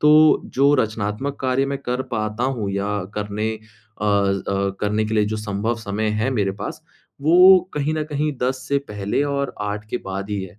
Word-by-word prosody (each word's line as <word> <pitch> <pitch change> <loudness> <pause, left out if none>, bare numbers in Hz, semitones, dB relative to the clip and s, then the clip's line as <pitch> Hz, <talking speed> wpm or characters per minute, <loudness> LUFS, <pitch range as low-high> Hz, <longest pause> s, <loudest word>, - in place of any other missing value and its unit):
तो 155 +1 +6
जो 140 +2 +4
रचनात्मक 110 +5 -2
कार्य 130 +1 +1
मैं 140 0 -2
कर 125 +1 -1
पाता 110 +2 -1
हूँ, 120 -6 -1
या 100 -1 -1
करने 105 +1 -2
अ 110 -1 -11
अ, 100 -1 +1
करने 105 +1 +1
के 110 - -2
लिए, 105 -1 +3
जो 110 +1 -2
संभव 105 +2 -2
समय 105 +2 -1
है 125 +5 +1
मेरे 105 -6 +1
पास, - - -5 0.4
वो 180 +4 +8 0.2
कहीं 150 +1 0
न 155 -1 -1
कहीं 150 +1 0
10 130 0 -1
से 140 0 +2
पहले 105 +6 -1
और 140 -1 -2
8 105 0 -3
के - - -1
बाद 100 +2 -4
ही 100 -2 -2
है। 95 +2 -10
110 Hz, 195 wpm, -22 LUFS, 105-135 Hz, 0.4 s, वो